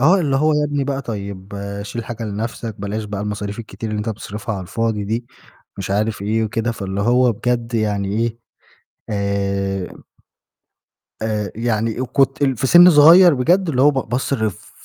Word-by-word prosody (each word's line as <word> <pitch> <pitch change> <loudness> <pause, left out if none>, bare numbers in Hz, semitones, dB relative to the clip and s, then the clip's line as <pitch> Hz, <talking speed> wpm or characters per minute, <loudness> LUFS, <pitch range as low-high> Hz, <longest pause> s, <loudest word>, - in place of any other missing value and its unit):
آه، 180 +8 +5
اللي 140 -4 +1
هو 155 +2 +3
"يا 150 0 +2
ابني 145 -2 -1
بقى 140 0 -2
طيب 100 -3 -6 0.3
شيل 115 +3 -6
حاجة 115 0 -6
لنَفْسك، 110 0 -5
بلاش 105 +2 -3
بقى 100 -1 -5
المصاريف 105 0 -4
الكتير 110 0 -6
اللي 105 - -2
أنت 105 +2 -3
بتصرفها 105 0 -5
على 95 - -5
الفاضي 105 +3 -2
دي،" 115 +4 -3 0.5
مش 95 - -5
عارف 105 +1 -1
إيه 110 +2 0
وكده 115 +2 -1
فاللي 100 -2 -4
هو 120 +2 +3
بجد 120 +2 -2
يعني 105 -3 0
إيه، 115 +3 -1 0.7
آآ 100 -2 -2 1.3
آآ 105 -3 -2
يعني 115 0 -1
آآ، - - 0
كنت 135 +2 +1
ال 135 -3 +2
في 130 - 0
سِن 175 +5 +8
صغيّر 165 +3 +8
بجد 175 +8 +2
اللي 130 -4 +1
هو 145 +2 +6
ب 130 -5 -3
باصرف 120 -4 -2
110 Hz, 175 wpm, -19 LUFS, 105-130 Hz, 1.3 s, سِن